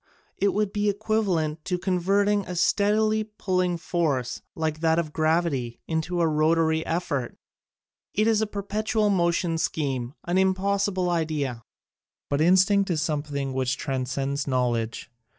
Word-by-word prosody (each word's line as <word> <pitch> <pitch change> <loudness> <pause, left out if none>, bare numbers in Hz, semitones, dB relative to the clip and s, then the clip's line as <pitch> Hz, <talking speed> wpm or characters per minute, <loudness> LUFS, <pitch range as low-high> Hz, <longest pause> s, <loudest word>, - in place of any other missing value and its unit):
It 200 - +3
would 210 -1 0
be 205 0 +1
equivalent 195 -7 0
to 180 - -1
converting 200 +3 +1
a 180 - -5
steadily 215 +4 +2
pulling 185 -4 -1
force, 150 -8 -1
like 155 -1 -2
that 160 0 +2
of 155 -3 -1
gravity, 155 -7 0
into 170 +2 -1
a 165 - +3
rotary 160 +1 +2
effort. 145 -7 -2 0.8
It 215 - +3
is 220 -1 +3
a 220 - 0
perpetual 210 +1 -1
motion 170 -2 +1
scheme, 135 -5 -2
an 175 +2 +1
impossible 190 -1 +1
idea." 150 -8 -2 0.7
But 140 +1 +1
instinct 190 +3 +4
is 165 -3 +1
something 145 -3 -2
which 130 0 0
transcends 135 +1 -2
knowledge. 120 -3 -1
170 Hz, 135 wpm, -25 LUFS, 150-200 Hz, 0.8 s, instinct